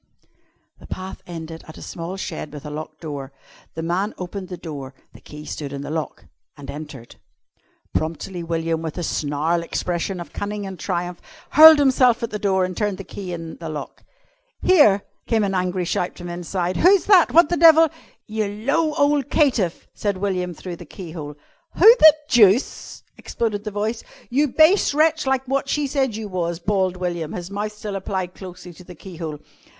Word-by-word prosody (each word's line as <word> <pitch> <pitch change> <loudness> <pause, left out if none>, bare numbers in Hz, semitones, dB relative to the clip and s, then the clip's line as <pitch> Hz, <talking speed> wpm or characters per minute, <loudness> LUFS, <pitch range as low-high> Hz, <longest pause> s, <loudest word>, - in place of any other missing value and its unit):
The - - -14
path 185 0 -7
ended 165 -1 -8
at 160 - -11
a - - -11
small 175 +3 -6
shed 160 -5 -5
with 145 -1 -9
a 150 - -6
locked 155 +1 -7
door. 145 -4 -6 0.4
The 160 - -4
man 185 +5 -1
opened 185 +1 -6
the 180 -1 -7
door 145 -6 -8 0.2
the - - -15
key 150 0 -11
stood 145 -3 -6
in 140 0 -5
the 145 - -6
lock 160 -1 -4 0.3
and 145 - -8
entered. 145 -5 -10 0.8
Promptly 165 +3 -3
William, 165 -1 -2
with 160 0 -5
a 175 - -3
snarl 155 +3 -1
expressive 175 +2 -3
of 170 -4 -9
cunning 205 0 -4
and 190 -2 -7
triumph, 175 -2 -3 0.3
hurled 315 +1 +10
himself 255 -4 +3
at 230 - -3
the 210 - -4
door 190 -2 +2
and 185 0 -5
turned 205 -1 -1
the 195 - -7
key 190 -1 -7
in 165 -1 -6
the 165 -2 -7
lock. 150 -2 -7 0.6
"Here!" 255 - +5 0.2
came 225 -2 +2
an 195 -1 -1
angry 180 -1 -1
shout 175 +1 -2
from 175 0 -7
inside. 175 +1 -3
"Who's 380 +1 +5
that? 380 -5 +6
What 335 -2 +6
the 350 - +1
devil 325 0 +7 0.2
" 230 - -37
"You 215 -1 +1
low 275 +10 0
ole 290 -1 +3
caitiff!" 255 - 0
said 200 -2 -2
William 185 -3 -2
through 175 +1 -7
the 175 - -10
keyhole. 160 -4 -8 0.4
"Who 455 +3 +8
the 310 -1 +9
deuce 225 -2 +3
?" - - -45
exploded 215 -3 -3
the - - -2
voice. 215 +3 -3 0.3
"You 290 +4 +3
base 315 +3 +4
wretch, 310 -1 +2
like 265 0 0
wot 275 +1 -1
she 295 0 0
said 270 -4 0
you 220 -1 -5
was," 170 -3 -2
bawled 185 0 0
William, 175 -3 -3
his 180 +1 -6
mouth 210 +1 -3
still 210 -1 -6
applied 190 -2 -3
closely 180 -2 -10
to 180 - -14
the 180 0 -12
keyhole. 165 -3 -7
185 Hz, 190 wpm, -22 LUFS, 165-225 Hz, 0.8 s, hurled